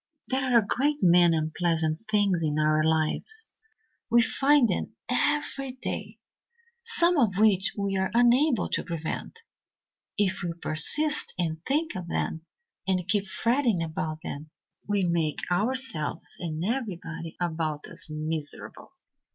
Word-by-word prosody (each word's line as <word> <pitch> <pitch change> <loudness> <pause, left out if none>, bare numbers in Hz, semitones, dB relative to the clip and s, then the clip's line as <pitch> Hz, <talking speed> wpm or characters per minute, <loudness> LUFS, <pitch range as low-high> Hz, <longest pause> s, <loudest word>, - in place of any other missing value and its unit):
"There 265 0 +1
are 250 -2 +3
a 220 - +3
great 290 +7 0
many 175 -2 +5
unpleasant 160 0 0
things 200 -5 +2
in 150 -2 0
our 155 0 +2
lives 160 - 0 0.6
we 235 +1 +5
find 275 +1 +3
them - - -3
every 275 -3 0
day 260 - -6 0.6
some 360 -8 +6
of 205 -7 +2
which 205 -2 +3
we 200 -1 -1
are 190 0 0
unable 245 +2 +3
to - - -1
prevent. 170 - -5 0.7
If 195 -3 +1
we 175 -1 -3
persist 300 - +1
in 160 -3 -2
thinking 295 - -1
of 175 - -11
them 165 -1 -3 0.4
and 185 -2 0
keep 200 +1 +1
fretting 230 -4 +1
about 155 -1 -4
them, 150 +2 -7 0.4
we 205 -1 +1
make 170 -3 0
ourselves 205 - -1
and 165 -1 -4
everybody 180 -9 -4
about 160 -3 -2
us - - -6
miserable. 155 -1 -4
185 Hz, 135 wpm, -27 LUFS, 160-250 Hz, 0.7 s, some